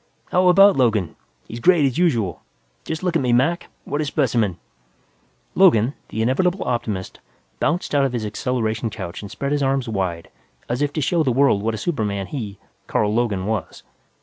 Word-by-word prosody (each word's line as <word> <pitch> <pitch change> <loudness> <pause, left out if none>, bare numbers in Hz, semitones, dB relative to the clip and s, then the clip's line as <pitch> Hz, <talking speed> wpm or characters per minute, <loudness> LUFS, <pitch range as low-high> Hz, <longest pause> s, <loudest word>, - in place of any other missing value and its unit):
"How 180 +1 +3
about 195 +3 +7
Logan? 110 -8 +1 0.3
He's 115 - -7
great, 170 +1 +4
as 135 +4 0
usual. 115 - +1 0.4
Just 160 +1 -4
look 180 -2 0
at 160 - +3
me, 125 -2 +1
Mac. 145 +8 +1 0.2
What 145 +2 -2
a - - -1
specimen!" 120 - 0 1.0
Logan, 140 - +4 0.2
the 110 - -2
inevitable 180 - +1
optimist, 110 -6 -3 0.4
bounced 175 0 -1
out 140 -1 +3
of 130 - -2
his 115 -3 -2
acceleration 110 +1 -2
couch 95 -4 -7
and 100 - -8
spread 140 +6 -4
his 145 -1 +1
arms 135 -2 0
wide 95 -6 -3 0.4
as 120 +3 -2
if 145 -1 +1
to 155 - -1
show 165 +5 +1
the 135 -5 +1
world 130 -5 +3
what 110 +1 -1
a - - -5
superman 105 - -2
he, 105 -5 -6 0.3
Carl 105 0 +1
Logan, 110 -5 0
was. 110 0 -4
125 Hz, 180 wpm, -21 LUFS, 110-145 Hz, 1.0 s, about